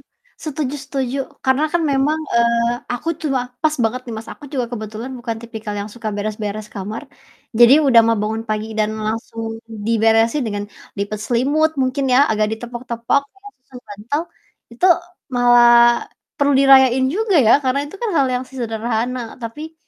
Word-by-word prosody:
heeh. -, -, -38 dB
Setuju 295 Hz, -2 st, -3 dB
setuju, 270 Hz, 0 st, -3 dB, 0.3 s
karena 265 Hz, +3 st, +2 dB
kan 345 Hz, -1 st, +1 dB
memang, 290 Hz, +4 st, +1 dB, 0.2 s
eee, 235 Hz, 0 st, +3 dB, 0.2 s
aku 275 Hz, +7 st, -5 dB
tua 270 Hz, -5 st, 0 dB, 0.2 s
pas 310 Hz, -1 st, +2 dB
banget 235 Hz, +3 st, 0 dB
nih 230 Hz, -, -5 dB
Mas 220 Hz, -, -8 dB
aku -, -, -15 dB
juga 250 Hz, -3 st, -1 dB
kebetulan 220 Hz, +2 st, -6 dB
bukan 230 Hz, -1 st, -4 dB
tipikal 220 Hz, -3 st, -6 dB
yang 205 Hz, +1 st, -6 dB
suka 230 Hz, -2 st, -5 dB
beres-beres 210 Hz, 0 st, -4 dB
kamar. 205 Hz, +5 st, -5 dB, 0.6 s
Jadi 240 Hz, +1 st, +8 dB
udah 240 Hz, -4 st, +7 dB
mah 230 Hz, -, +3 dB
bangun 220 Hz, +1 st, -2 dB
pagi 215 Hz, 0 st, -1 dB
dan 215 Hz, 0 st, +1 dB, 0.2 s
langsung 225 Hz, 0 st, -4 dB, 0.3 s
diberesin 225 Hz, +4 st, +3 dB
dengan 205 Hz, -1 st, -3 dB, 0.3 s
lipet 205 Hz, +1 st, -3 dB
selimut 285 Hz, +6 st, +2 dB
mungkin 270 Hz, +2 st, -1 dB
ya, 255 Hz, -, +6 dB
agak 215 Hz, -1 st, +1 dB
ditepok-tepok 240 Hz, +2 st, -2 dB
setelah 405 Hz, +1 st, -15 dB
susun 250 Hz, -1 st, -12 dB
bantal, 220 Hz, +10 st, -3 dB, 0.5 s
itu 240 Hz, +10 st, +1 dB, 0.5 s
malah 245 Hz, 0 st, +5 dB, 0.7 s
perlu 285 Hz, 0 st, +3 dB
dirayain 265 Hz, -1 st, +6 dB
juga 425 Hz, -1 st, 0 dB
ya -, -, +6 dB
karena 260 Hz, +1 st, +1 dB
itu 295 Hz, -, -12 dB
kan 455 Hz, -, 0 dB
hal 275 Hz, -4 st, +3 dB
yang 250 Hz, +1 st, -2 dB
se 265 Hz, -, -18 dB
sederhana 230 Hz, +2 st, -2 dB, 0.2 s
tapi 300 Hz, +8 st, -7 dB
240 Hz, 165 wpm, -19 LUFS, 225-275 Hz, 0.7 s, Jadi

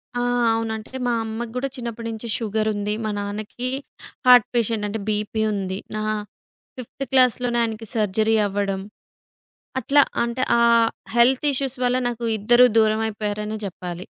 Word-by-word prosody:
ఆ! 245 Hz, -, 0 dB, 0.3 s
అవునంటే 225 Hz, +1 st, -3 dB
మా 240 Hz, -, +2 dB
అమ్మకి 225 Hz, +1 st, -5 dB
గూడా 270 Hz, +2 st, -1 dB
చిన్నప్పటి 235 Hz, -1 st, -5 dB
నుంచి 225 Hz, +1 st, -7 dB
షుగరుంది. 215 Hz, -2 st, -1 dB
మా -, -, -1 dB
నాన్నకి 210 Hz, +5 st, -4 dB, 0.6 s
హార్ట్ 245 Hz, -3 st, +8 dB
పేషెంట్ 225 Hz, -2 st, +1 dB
అంటే 215 Hz, +2 st, -4 dB
బీపీ 210 Hz, +1 st, -1 dB
ఉంది. 190 Hz, -1 st, -3 dB, 0.2 s
నా 215 Hz, -, -2 dB, 0.7 s
ఫిఫ్త్ 255 Hz, +2 st, -7 dB
క్లాస్‌లోనే 250 Hz, -2 st, +3 dB
ఆయనకి 225 Hz, 0 st, -4 dB
సర్జరీ 215 Hz, +1 st, +2 dB
అవ్వడం 195 Hz, -1 st, -2 dB, 1.0 s
అట్లా 280 Hz, +4 st, +4 dB, 0.2 s
అంటే 235 Hz, +2 st, -2 dB, 0.2 s
ఆ -, -, +3 dB, 0.5 s
హెల్త్ 255 Hz, +4 st, +4 dB
ఇష్యూస్ 270 Hz, -1 st, -2 dB
వల్ల 250 Hz, +1 st, +2 dB
నాకు 240 Hz, -1 st, -3 dB
ఇద్దరు 240 Hz, +4 st, +5 dB
దూరమైపోయారనే 215 Hz, -1 st, 0 dB
జెప్పాలి. 180 Hz, -2 st, -6 dB
220 Hz, 130 wpm, -23 LUFS, 210-240 Hz, 1.0 s, హార్ట్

